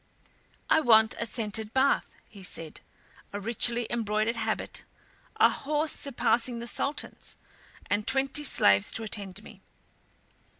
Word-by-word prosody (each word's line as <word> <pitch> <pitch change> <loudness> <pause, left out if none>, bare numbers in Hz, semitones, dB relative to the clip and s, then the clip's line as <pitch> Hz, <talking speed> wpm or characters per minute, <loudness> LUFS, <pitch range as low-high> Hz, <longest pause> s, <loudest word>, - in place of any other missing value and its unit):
"I - - +4
want 220 -6 +5
a - - -1
scented 220 0 -2
bath," 270 +1 +2 0.2
he 200 - -14
said, 165 -4 -6 0.5
"a 205 - -5
richly 235 +2 +3
embroidered 220 0 -1
habit, - - -3 0.5
a - - +5
horse 300 +2 -1
surpassing 245 -2 0
the 235 - -6
Sultan's, 280 +4 -2 0.5
and 205 +1 -1
twenty 270 +2 +2
slaves 100 - +3
to 225 - -1
attend 200 -3 -4
me. - - -14
230 Hz, 125 wpm, -27 LUFS, 210-260 Hz, 0.5 s, want